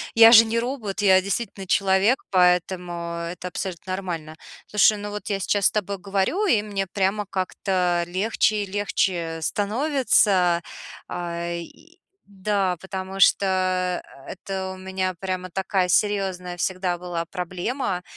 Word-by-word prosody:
Я 225 0 +9
же 225 -1 +10
не 230 +1 -1
робот, 230 -5 -3
я 190 -2 +5
действительно 200 0 -3
человек, 195 +6 +2
поэтому 180 -1 +2 0.4
это 180 +1 -7
абсолютно 185 0 -5
нормально. 170 -5 -5 0.3
Слушай, 210 +1 +4
ну 205 0 -6
вот 210 0 -6
я 200 -1 -1
сейчас 200 +1 +2
с - - +1
тобой 200 -1 -2
говорю, 200 - 0
и 235 - +3
мне 200 -2 -3
прямо 200 +2 0
как-то 185 -2 0
легче 210 +3 +1
и - - -4
легче 185 -4 -1
становится. 205 - +2 0.5
Э, 170 0 -4
и 330 - -14 0.3
да, 195 -1 -1
потому 190 0 -6
что 185 -2 +2 0.2
это 190 0 -5
у - - -10
меня 185 0 -3
прямо 185 -1 -4
такая 190 0 0
серьезная 185 -2 0
всегда 185 0 -1
была 175 -1 -4
проблема. 180 +3 -3
190 Hz, 135 wpm, -24 LUFS, 180-205 Hz, 0.5 s, же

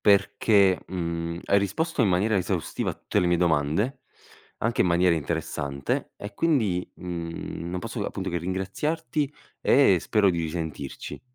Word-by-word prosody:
perché, 100 -1 +4
mhmm, 85 -1 -3
hai 100 - +4
risposto 145 - -1
in 110 - +4
maniera 100 +4 +2
esaustiva 90 - -2
a - - -6
tutte - - -1
le 90 - +2
mie 90 0 +3
domande, 85 - +1 0.6
anche 115 +1 0
in - - +5
maniera 90 0 +4
interessante 70 -3 -2
e 100 +2 -7
quindi, 110 - +1
mhmm, 85 -1 -5
non 90 - -2
posso - - -4
appunto - - -3
che 85 - -1
ringraziarti 115 - -2 0.3
e 125 -10 +5
spero 105 +1 +3
di 85 - -1
risentirci. 80 -4 -5
90 Hz, 150 wpm, -26 LUFS, 85-105 Hz, 0.6 s, in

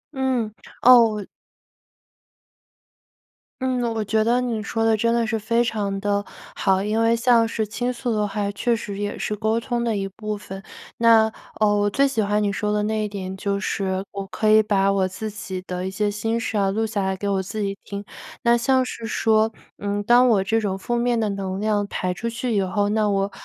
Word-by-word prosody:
嗯， 255 -5 0 0.3
哦 245 -1 +9
我 205 -2 -5 2.4
嗯， 255 -1 0
我 220 -1 -1
觉 215 +1 +1
得 240 +2 +2
你 235 -3 -2
说 225 +2 -2
得 225 -1 +3
真 230 +2 +1
的 235 -1 +2
是 225 0 -1
非 230 +3 +1
常 205 -4 -2
地 205 0 0 0.3
好。 190 0 +2
因 215 +2 0
为 230 +1 +3
像 230 -1 +4
是 220 -1 -2
倾 245 +4 -2
诉 245 -1 -3
的 210 -1 0
话， 200 0 -2
确 235 +4 0
实 205 -3 -6
也 205 0 -3
是 210 - -2
沟 220 +2 0
通 240 0 -2
的 230 -2 0
一 195 -1 -2
部 210 +2 -5
分。 195 -1 -9 0.4
那， 225 -1 +5 0.3
呃， 215 - +4
我 205 0 +2
最 275 +7 +3
喜 230 -5 0
欢 210 +1 +1
你 205 - +1
说 210 +1 -1
的 210 0 +1
那 215 0 0
一 - - -2
点 190 -2 -6
就 200 0 -1
是 190 -2 -2
我 200 -1 -5
可 205 +3 0
以 215 0 +7
把 195 -2 +2
我 195 -1 +1
自 215 +4 -5
己 195 -3 -6
的 180 0 -4
一 - - -4
些 205 +2 0
心 225 +2 -1
事 225 -2 -2
啊， 195 -1 +2
录 220 +2 0
下 210 -2 -2
来 190 0 0
给 200 +2 -3
我 195 -1 +1
自 210 +3 -5
己 200 0 -2
听。 200 0 -6 0.4
那 235 -1 +4
像 260 +2 +2
是 235 -2 -6
说， 220 0 +2 0.3
嗯， 205 0 -2
当 240 +3 +5
我 210 -5 +3
这 225 +3 +1
种 195 -3 -2
负 240 +5 -3
面 240 0 +1
的 215 - 0
能 195 -1 -3
量 210 -1 +1
排 185 -2 -2
出 230 +6 -4
去 235 +1 -3
以 200 - +3
后， 205 +2 0
那 215 0 +1
我 195 0 0
215 Hz, 235 characters per minute, -23 LUFS, 200-230 Hz, 2.4 s, 哦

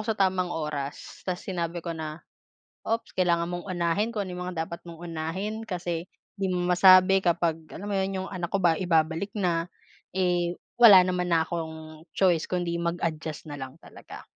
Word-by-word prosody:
sa 220 - +2
tamang 185 -2 +2
oras, 150 -4 -5
tapos 180 -1 -3
sinabi 170 -2 -3
ko 170 - -2
na, 155 0 -7 0.6
"Ops, 225 0 -2
kailangan 170 -2 +2
mong 175 +2 -5
unahin 175 +4 0
kung 215 -3 -2
ano 180 -1 -6
mga 180 -3 -3
dapat 170 +1 -8
mong 170 0 -9
unahin 185 +7 -4
kasi 175 -2 -3 0.3
'di 195 - +1
mo 180 -1 0
masabi 185 +1 +7
kapag," 170 -2 +1 0.2
alam 195 - -8
mo 205 - -3
'yon 190 -1 -1
'yong - - -7
anak 175 -2 -3
ko - - 0
ba 175 -4 +4
ibabalik 170 +3 +1
na. 175 -4 0 0.5
Eh, 175 -2 +1 0.2
wala 200 -6 +10
naman 180 -1 -1
na 165 -1 +3
akong 160 -1 -7
choice 175 -4 +3
kundi 175 -2 -1
mag-adjust 160 -3 -3
na 145 - -7
lang 130 +3 -7
talaga. - - -12
175 Hz, 175 wpm, -27 LUFS, 165-185 Hz, 0.6 s, wala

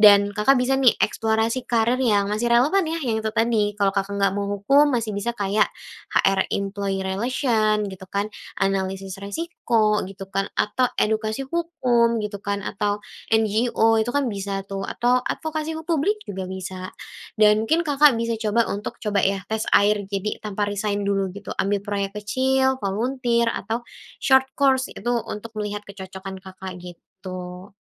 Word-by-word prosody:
dan 205 -1 +7
Kakak 245 +6 +4
bisa 265 +2 +2
nih 250 -3 +6
eksplorasi 225 +3 +1
karier 235 +2 +2
yang 210 -6 +3
masih 235 +3 0
relevan 300 +11 +4
ya, 330 +1 -2
yang 225 -2 0
itu 220 - -1
tadi 225 -3 +1
kalau 200 -1 +3
Kakak 195 0 -1
nggak 195 -1 +2
mau 200 0 -1
hukum 275 +9 +4
masih 225 -3 -1
bisa 235 +4 -2
kayak 205 +1 +2 0.5
HR 195 -1 +3
Employee 195 -1 -2
Relation 215 +1 +1
gitu 190 -1 -10
kan, 200 +1 -1 0.3
analisis 195 0 -1
resiko 220 -4 0
gitu 195 0 -8
kan, 195 0 0
atau 250 +4 +2
edukasi 220 +4 0
hukum 255 -9 +1
gitu 205 -1 -5
kan, 200 0 -2
atau 205 0 -1 0.4
NGO 225 +1 +3
itu 220 - -1
kan 285 -1 +2
bisa 195 -1 -3
tuh 195 0 -4
atau 250 +1 +2
advokasi 315 0 -3
hu 320 - -6
publik 335 +6 +1
juga 190 -1 -4
bisa 185 0 -6 0.5
dan 210 0 +6
mungkin 320 +8 +2
Kakak 290 -1 +5
bisa 230 0 -1
coba 225 +1 +2
untuk 205 +2 -5
coba 205 -2 +1
ya 195 0 0
tes 220 0 0
air, 205 +1 +3
jadi 200 +1 -3
tanpa 210 -1 -2
resign 205 0 -1
dulu 195 -1 +1
gitu, 205 - -6
ambil 200 0 0
proyek 200 -1 -3
kecil, 265 +5 +1
volunteer 235 +3 +1
atau 225 +4 -3 0.4
short 265 -1 +5
course, 265 -1 +3
itu 240 +4 -2 0.2
untuk 220 +2 -6
melihat 210 0 -3
kecocokan 190 -1 -8
Kakak, 190 -1 -8
gitu. 180 +1 -9
210 Hz, 160 wpm, -23 LUFS, 195-240 Hz, 0.5 s, dan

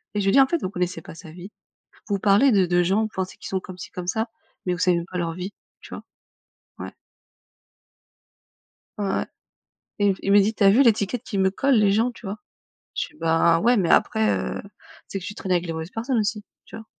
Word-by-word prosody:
Et 210 - +1
je 195 - -1
lui 195 - +3
ai - - +2
dit: 275 - +6
«En 270 - +5
fait, 340 - 0
vous 185 - -2
connaissez 180 -3 -3
pas 160 - -11
sa 160 -1 -12
vie. 180 +4 -11 0.6
Vous 200 -2 -1
parlez 210 +7 +4
de 195 -4 +4
de 175 0 +2
gens, 195 +5 +2
vous 220 - -2
pensez 190 0 -4
qu'ils - - -9
sont 190 - -1
comme 185 0 -11
ci 180 - -9
comme 180 -1 -7
ça, 220 +4 -1 0.4
mais 180 - 0
vous 175 - -5
savez 180 -1 +3
même 170 - -3
pas 180 - -5
leur 165 -1 -2
vie». 185 +3 -6 0.3
Tu - - -13
vois? - - -8 0.7
Ouais. - - -7 2.1
Ouais, 195 -1 -1 0.7
et 205 0 +3
et - - +1
il 195 - -1
me 205 - +7
dit: 215 +3 +1
«Tu 205 - -2
as 195 - +7
vu 250 +7 +5
l'étiquette 225 0 +1
qu'ils 200 - -2
me 190 0 +3
collent 275 +7 +1
les 210 -3 +4
gens, 225 +5 +2
tu 230 - -12
vois?» 200 +2 -4 0.6
je - - -2
dis: - - -23
«Bah 165 0 +3
ouais, 240 +5 +3
mais 190 -7 +1
après, 220 -1 +3
heu, - - -4 0.5
c'est 195 - -4
que 185 - -9
tu 205 - -7
trainais 185 -2 -1
avec 175 - -1
les 165 - -3
mauvaises 160 +2 -6
personnes 235 +2 -2
aussi». 210 0 -2 0.2
Tu - - -10
vois? 225 - -11
195 Hz, 245 wpm, -23 LUFS, 180-220 Hz, 2.1 s, me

